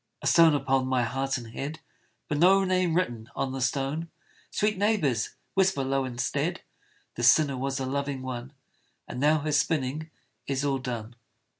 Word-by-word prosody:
A - - -5
stone 165 -2 +6
upon 135 -2 +1
my 130 -1 +2
heart 135 +3 -1
and 115 -2 -9
head, 150 +6 -5 0.5
But 150 - -1
no 190 +3 +6
name 185 -3 +1
written 120 -11 -1
on 135 - -1
the 135 0 -4
stone! 140 +6 -1 0.4
Sweet 210 +1 +1
neighbours, 185 - +1 0.2
whisper 190 -7 +2
low 135 0 0
instead, 120 -1 -2 0.5
"This 120 0 +6
sinner 145 -4 +2
was 135 +1 -2
a 130 - -2
loving 140 0 -2
one, 130 0 -5 0.6
And - - -6
now 150 +2 +3
her 155 +1 -2
spinning 150 0 0 0.4
is 135 0 -1
all 135 -1 +1
done." 120 -3 -5
135 Hz, 165 wpm, -27 LUFS, 130-160 Hz, 0.6 s, stone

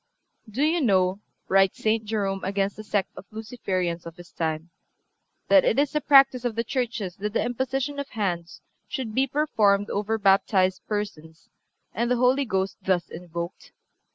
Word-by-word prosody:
"Do 245 +7 -1
you 325 +2 +2
know," 190 -5 +2 0.3
writes 195 0 +3
St. 220 0 +2
Jerome 200 -3 -2
against 195 +1 -1
the 215 - -8
sect 205 -3 -1
of 195 - -11
Luciferians 185 -7 -3
of 165 - -9
his 175 -1 -14
time, 160 +1 -3 0.8
"that 290 -2 +6
it 225 - +2
is 285 0 +2
the 300 - 0
practice 270 -3 +5
of 240 -3 -2
the 230 - 0
churches 230 -7 -3
that 210 +1 -3
the 225 - +1
imposition 265 +3 -2
of 280 - -5
hands 175 -6 -3 0.3
should 245 -5 -4
be 265 +4 +2
performed 215 -8 +2
over 210 +2 -1
baptized 195 -2 +3
persons 160 -7 -5 0.4
and 235 0 -1
the 250 - +3
Holy 255 +3 +3
Ghost 190 -3 -1
thus 180 -3 0
invoked? 170 +1 -7
210 Hz, 165 wpm, -25 LUFS, 185-250 Hz, 0.8 s, that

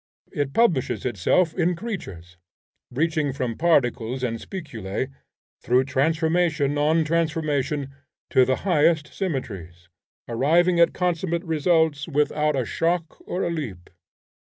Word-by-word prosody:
It 140 -2 -2
publishes 175 - +2
itself 130 - +1
in 175 0 +1
creatures, 100 - -7 0.5
reaching 155 +1 0
from 125 -4 -3
particles 130 -6 +1
and 115 -2 -2
spiculae 130 - -5 0.5
through 125 +2 +3
transformation 155 +1 +1
on 160 +2 +3
transformation 155 -4 -1 0.4
to 130 - +5
the 130 +1 +2
highest 155 -3 +2
symmetries, 95 - -5 0.4
arriving 170 +9 +2
at 170 - +4
consummate 175 -1 -1
results 160 -3 +1
without 150 0 +1
a 130 -3 0
shock 165 +5 -1
or 180 - -2
a 170 - -1
leap. 115 - -6
150 Hz, 115 wpm, -24 LUFS, 130-170 Hz, 0.5 s, to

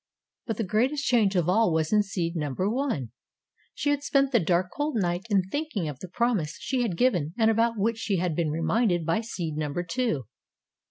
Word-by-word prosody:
But 225 -3 -2
the 225 - 0
greatest 250 +9 0
change 215 -5 +3
of 175 -3 +2
all 215 +2 +3
was 160 +3 0
in 210 - +5
seed 180 -4 -3
number 150 +3 -1
One. 220 - -1 0.6
She 290 - 0
had 290 -1 0
spent 275 -1 +2
the 240 - +4
dark, 180 +1 +1
cold 295 -1 -2
night 180 0 -1
in 200 -3 +3
thinking 215 - -3
of 145 -3 -6
the 185 - -7
promise 200 -5 -1
she 260 -2 -1
had 205 -8 -1
given 175 - +1
and 225 -1 +4
about 230 +1 +1
which 225 +3 0
she 200 -4 0
had 175 -2 -1
been 165 -2 0
reminded 175 +3 +1
by 165 +7 +1
seed 170 -9 -4
number 155 +3 -2
Two. 175 - -1
195 Hz, 205 wpm, -27 LUFS, 170-235 Hz, 0.6 s, in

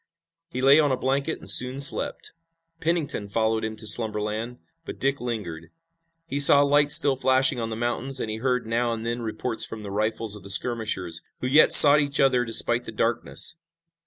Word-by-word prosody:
He 130 -5 -6
lay 140 +3 +5
on 145 -3 +1
a 130 - -1
blanket 135 +4 -3
and - - -16
soon 125 +2 +4
slept. 140 - +1 0.5
Pennington 160 -11 -3
followed 110 +1 -2
him 110 0 -5
to 110 0 -12
slumberland, 110 +2 -2 0.3
but - - -10
Dick 135 0 -2
lingered. 90 -9 -7 0.6
He 140 -3 -5
saw 140 0 +5
lights 145 0 +3
still 140 -2 +1
flashing 130 0 +1
on 115 -1 -5
the 110 - -6
mountains, 120 +3 -3
and - - -5
he 110 0 -6
heard 125 +1 -3
now 115 +1 -2
and 115 0 -8
then 120 +1 -4
reports 115 +1 -5
from 110 -1 -7
the 100 - -9
rifles 110 +1 -3
of 105 - -13
the 100 - -13
skirmishers, 100 -6 0 0.2
who - - -4
yet 145 +4 +3
sought 145 0 +9
each 140 -1 -2
other 130 -3 +1
despite 120 +1 +2
the - - -8
darkness. 115 +8 -3
120 Hz, 190 wpm, -23 LUFS, 110-135 Hz, 0.6 s, sought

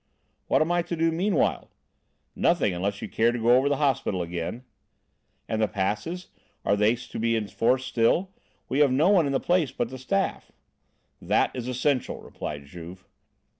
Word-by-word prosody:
"What - - +4
am 165 - -2
I 175 0 +2
to 170 0 -4
do 165 0 +2
meanwhile?" 180 +1 0 0.7
"Nothing, 100 - +2
unless 100 +3 -3
you - - -3
care 115 +1 +2
to 120 - -3
go 120 +1 +4
over 135 +3 +3
the 145 - +1
hospital 130 -10 0
again." 85 +7 -5 0.8
"And 110 0 -1
the 110 - +3
passes? 105 - -3 0.4
Are 100 - +3
they 105 +3 +3
to 120 - -8
be 115 0 +1
in 110 -2 -1
force 130 +5 +1
still? 130 +10 +1 0.4
We 135 - -1
have 145 -3 +5
no 150 +8 +3
one 180 -7 +4
in - - -1
the 135 - +1
place 175 -5 +1
but 120 - -2
the 130 +1 -8
staff." 120 -6 -1 0.7
"That - - +1
is 125 -1 -4
essential," 130 +1 0
replied 70 -2 -7
Juve. 90 +5 -10
125 Hz, 180 wpm, -26 LUFS, 105-150 Hz, 0.8 s, have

